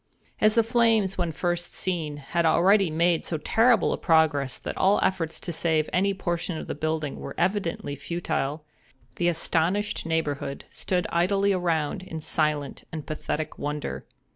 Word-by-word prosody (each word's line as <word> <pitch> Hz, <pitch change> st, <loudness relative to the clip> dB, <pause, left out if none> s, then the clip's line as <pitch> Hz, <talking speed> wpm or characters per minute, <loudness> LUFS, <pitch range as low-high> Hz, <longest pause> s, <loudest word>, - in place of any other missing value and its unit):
As 215 Hz, 0 st, +4 dB
the 230 Hz, -, +5 dB
flames, 225 Hz, -4 st, +2 dB
when 175 Hz, -2 st, 0 dB
first 175 Hz, +2 st, -2 dB
seen, 160 Hz, -5 st, -2 dB
had 160 Hz, +4 st, -1 dB
already 185 Hz, +4 st, +4 dB
made 165 Hz, +1 st, +2 dB
so 160 Hz, -, -2 dB
terrible 225 Hz, +8 st, +3 dB
a -, -, -4 dB
progress 155 Hz, -5 st, +2 dB
that -, -, -6 dB
all 195 Hz, +2 st, +3 dB
efforts 165 Hz, -4 st, -1 dB
to 170 Hz, -, -5 dB
save 160 Hz, -1 st, +1 dB
any 195 Hz, +2 st, +3 dB
portion 175 Hz, -3 st, -2 dB
of -, -, -5 dB
the -, -, -4 dB
building 155 Hz, -1 st, -2 dB
were -, -, -7 dB
evidently 175 Hz, -6 st, -1 dB
futile, 150 Hz, -1 st, -3 dB, 0.5 s
the 175 Hz, -, +1 dB
astonished 175 Hz, +4 st, 0 dB
neighborhood 145 Hz, -4 st, -2 dB
stood 180 Hz, -2 st, -1 dB
idly 195 Hz, +3 st, +2 dB
around 165 Hz, -5 st, 0 dB
in 165 Hz, -3 st, -7 dB
silent 150 Hz, -2 st, -1 dB
and 155 Hz, -3 st, -6 dB
pathetic 155 Hz, +1 st, -4 dB
wonder. 150 Hz, 0 st, -3 dB
170 Hz, 155 wpm, -26 LUFS, 155-190 Hz, 0.5 s, the